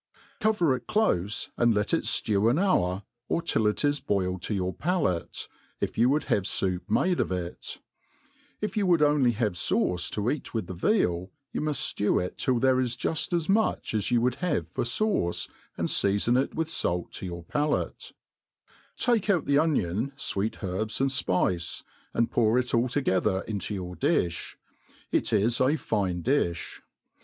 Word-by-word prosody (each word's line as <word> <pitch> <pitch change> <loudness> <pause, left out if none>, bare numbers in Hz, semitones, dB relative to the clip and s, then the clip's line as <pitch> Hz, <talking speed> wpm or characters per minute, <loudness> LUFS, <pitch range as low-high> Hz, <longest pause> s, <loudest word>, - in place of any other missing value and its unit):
Cover 180 -11 +2
it 125 -2 -9
clofe, 105 - 0
and 120 -2 +3
let 105 +6 0
it 165 - +2 0.2
(lew 105 +1 +3
an 125 - +2
hour, 100 - +1 0.3
or - - +1
till 110 -9 +1
it 105 +7 +1
is 145 0 +2
boil 95 -3 0
ed - - -16
to 105 - -2
your 95 -1 -1
palate, 155 - -1 0.3
if - - -2
you 120 +3 +4
would 150 +3 +2
have 100 - 0
foup 90 -2 0
made 180 - +2
of - - 0
it; 90 -1 -4 0.8
if 210 -2 -3
you 205 -3 +1
would 170 -4 +4
only 145 -5 +3
have 110 -3 0
fauce 90 +1 0
to 105 +3 -1
eat 145 -4 -5
with 110 - -1
the 95 - -6
veal, 90 - +1 0.2
you - - -3
muft 150 -1 0
ftew 105 - +1
it - - -9
till 130 -2 +1
there 130 +1 +3
is 125 -1 -1
juft 160 +5 -1
as 170 -2 0
much 215 - +1
as 105 -2 0
you 120 -2 +3
would 125 +1 +1
have 155 - -1
for - - -2
fauce, 120 - 0 0.3
and - - 0
feafon 100 +4 +3
it - - -15
with 160 0 -2
fait 90 - -1
to - - -6
your 85 -1 -6
palate; 145 - -2 0.9
take 230 -5 +1
out 180 -6 +2
the 140 0 +3
onion, 135 - 0
fweet 110 -5 -2
herbs, 100 +4 -2
and 135 0 +2
fpice, 90 -8 0 0.3
and 115 - +1
pour 115 0 +3
it 125 0 0
all 120 +2 +3
together 95 -8 +1
into 105 -1 -4
your 90 -1 -5
difh« 85 -1 0 0.6
It - - +1
is 115 +3 +2
a 135 +4 +4
fine 100 - -1
difh. 115 - 0
115 Hz, 180 wpm, -27 LUFS, 95-145 Hz, 0.9 s, you